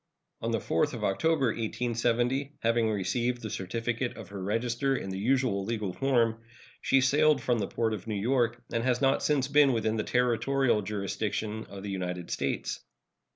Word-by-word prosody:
On - - -1
the - - +1
4th - - 0
of - - -6
October, 155 +8 +2
1870, 120 +4 0
having 115 0 +2
received 120 +4 -1
the 110 - -4
certificate 115 +5 -3
of 110 -5 -9
her 100 -1 -7
register 120 +7 0
in 95 - -4
the 95 - -4
usual 120 -3 +1
legal 105 -3 -2
form, 120 -3 +1 0.4
she 135 - +4
sailed 150 +3 +4
from 120 -2 0
the 100 - -1
port 115 -1 -1
of 105 0 -6
New 105 -2 -2
York 120 +1 +1
and 115 - 0
has 125 -1 +1
not 135 -1 +2
since 140 -3 +1
been 145 -1 +5
within 110 -1 0
the 105 - 0
territorial 125 0 +2
jurisdiction 105 +2 -3
of 100 -1 -9
the 100 - -4
United 90 -2 -4
States. - - -2
115 Hz, 175 wpm, -29 LUFS, 105-130 Hz, 0.4 s, been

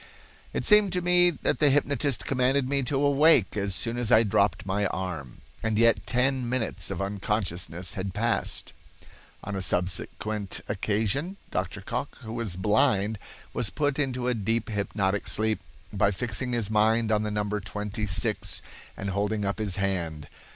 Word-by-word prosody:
"It - - -3
seemed 210 -2 +6
to 180 - +1
me 175 0 +6
that 170 - -1
the 150 - +5
hypnotist 140 -1 +1
commanded 130 0 +1
me 140 +1 +1
to 135 +1 0
awake 145 - +4
as 100 -2 -1
soon 115 +4 -1
as 120 -3 -1
I 110 - +7
dropped 100 -2 +1
my 100 +1 0
arm," 85 -8 -5 0.2
and 110 -1 -1
yet 115 +1 +3
ten 125 0 +1
minutes 125 -3 -2
of 95 0 -3
unconsciousness 95 -3 -2
had 95 -2 -4
passed. 115 +2 -1 0.7
On 105 0 -4
a 95 - -2
subsequent 95 +3 -1
occasion 110 - -1
Dr. - - -3
Cocke, - - -4
who 110 - -7
was 115 -6 -2
blind, 105 +1 +2 0.3
was 115 - +1
put 145 +1 -1
into 130 -3 -1
a 125 - +2
deep 115 +1 -1
hypnotic 100 -1 -1
sleep 110 0 +1 0.3
by - - +3
fixing 120 +4 -2
his 110 -3 0
mind 110 +1 +3
on 105 -1 +2
the 105 - -2
number 105 0 -1
26 105 -1 -1 0.3
and 100 0 -3
holding 105 +2 -1
up 100 +2 -2
his 100 -4 -1
hand. 85 -6 -2
110 Hz, 160 wpm, -27 LUFS, 100-125 Hz, 0.7 s, I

